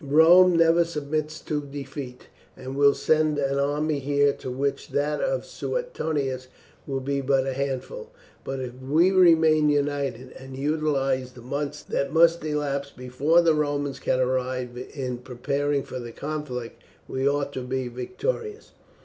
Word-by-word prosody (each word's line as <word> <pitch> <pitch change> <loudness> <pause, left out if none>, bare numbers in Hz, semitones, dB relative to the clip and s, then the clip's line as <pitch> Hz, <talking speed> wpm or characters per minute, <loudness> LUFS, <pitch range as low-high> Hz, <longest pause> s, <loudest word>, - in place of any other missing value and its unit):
Rome 170 +5 +6
never 165 +1 +5
submits 155 -1 -3
to 150 -2 -2
defeat, 140 -2 -8 0.3
and 130 +1 -7
will 140 0 +5
send 155 -1 +2
an 140 -1 0
army 145 +1 0
here 140 +1 +2
to - - -7
which 135 +2 -2
that 145 +1 0
of - - -1
Suetonius 145 - -3 0.4
would 135 -2 -3
be 140 0 0
but 135 0 +2
a 135 - -2
handful. 140 - -4 0.3
But 135 -1 -4
if 125 -1 -5
we 155 +8 +3
remain 160 -4 +5
united, 140 -3 -1
and 130 0 -10
utilize 135 -3 0
the 120 - -13
months 145 +3 -4
that 140 - -2
must 165 +1 +4
elapse 145 -2 -2
before 135 +6 +2
the 165 -1 +4
Romans 145 -2 -1
can 130 - 0
arrive 130 -1 -1 0.2
in 125 -4 -4
preparing 140 +3 -1
for 130 - -7
the 120 -1 -7
conflict, 140 -4 -5 0.3
we 130 +1 0
ought 140 0 -1
to 130 - -4
be 130 0 -3
victorious." 415 - -4
140 Hz, 150 wpm, -25 LUFS, 130-155 Hz, 0.4 s, Rome